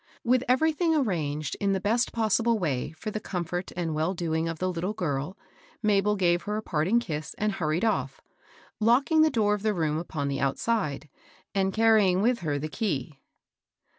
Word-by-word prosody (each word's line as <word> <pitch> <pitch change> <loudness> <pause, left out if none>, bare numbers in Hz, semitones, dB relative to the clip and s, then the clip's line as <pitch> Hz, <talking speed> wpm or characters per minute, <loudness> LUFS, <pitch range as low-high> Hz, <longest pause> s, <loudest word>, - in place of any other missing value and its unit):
With 250 +1 +3
everything 320 +6 +2
arranged 155 - -1
in 200 -1 +1
the 190 - 0
best 225 +5 +1
possible 230 +1 +2
way 145 -10 -2
for 215 +7 -6
the 215 - -3
comfort 180 -2 -4
and 170 -3 -2
well 160 +5 0
doing 165 -1 -1
of 165 - -4
the 185 +2 -1
little 180 +4 -2
girl, 150 -1 -3 0.5
Mabel 210 0 +3
gave 175 -3 +2
her 210 0 -3
a 215 - -4
parting 175 +8 +1
kiss, 155 -9 -5
and 215 0 0
hurried 170 +1 -1
off, 220 - -1 0.6
locking 260 +8 +4
the 315 - +5
door 215 -6 +2
of 210 - -2
the 215 -1 0
room 155 -2 0
upon 155 -4 -4
the 140 -1 -2
outside, 150 - -1 0.5
and 195 -1 +1
carrying 215 -4 +4
with 240 +1 +2
her 150 -5 -1
the 150 +2 -3
key. 150 - -3
190 Hz, 180 wpm, -27 LUFS, 160-220 Hz, 0.6 s, the